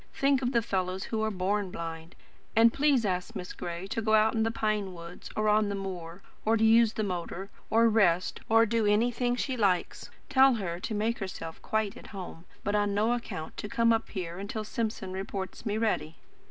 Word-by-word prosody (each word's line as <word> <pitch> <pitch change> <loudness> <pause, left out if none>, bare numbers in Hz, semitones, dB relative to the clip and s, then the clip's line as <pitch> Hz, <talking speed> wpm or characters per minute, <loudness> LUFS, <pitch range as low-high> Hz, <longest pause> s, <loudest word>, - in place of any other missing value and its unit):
Think 275 -1 +3
of 250 -1 0
the 235 -3 +2
fellows 190 -3 -1
who 220 -1 -2
are 220 - +1
BORN 200 0 -1
blind. 165 -1 -7 0.4
And 230 +1 +6
please 280 -5 +3
ask 185 +3 -2
Miss 180 -2 -5
Gray 170 +1 -5
to 210 +3 -3
go 220 0 +3
out 215 +1 +4
in 225 - +1
the 225 - +2
pine 215 -4 -1
wood, 170 +1 -10
or 215 0 +1
on 210 0 +3
the 200 - -2
moor, 185 -2 -6 0.2
or 220 +1 +3
use 225 0 +5
the 215 - -1
motor, 185 0 -4 0.2
or 230 +1 +5
rest, 185 -6 +2
or 225 +1 +6
do 225 -1 +1
anything 240 +3 +2
she 260 +1 -2
likes. 195 -6 0 0.2
Tell 265 -2 +5
her 175 -5 -3
to 215 +4 -4
make 220 +3 0
herself 165 -5 -6
quite 220 -2 -1
at - - -12
home; 185 -4 -8 0.2
but 205 -2 -1
on 205 -1 +1
no 220 +3 +2
account 200 -9 -5
to 210 - -5
come 230 +2 +3
up 225 0 -1
here 180 -3 -5
until 205 +2 -4
Simpson 215 -3 -3
reports 190 +3 -5
me 210 0 0
ready." 210 -8 0
210 Hz, 205 wpm, -29 LUFS, 185-225 Hz, 0.4 s, And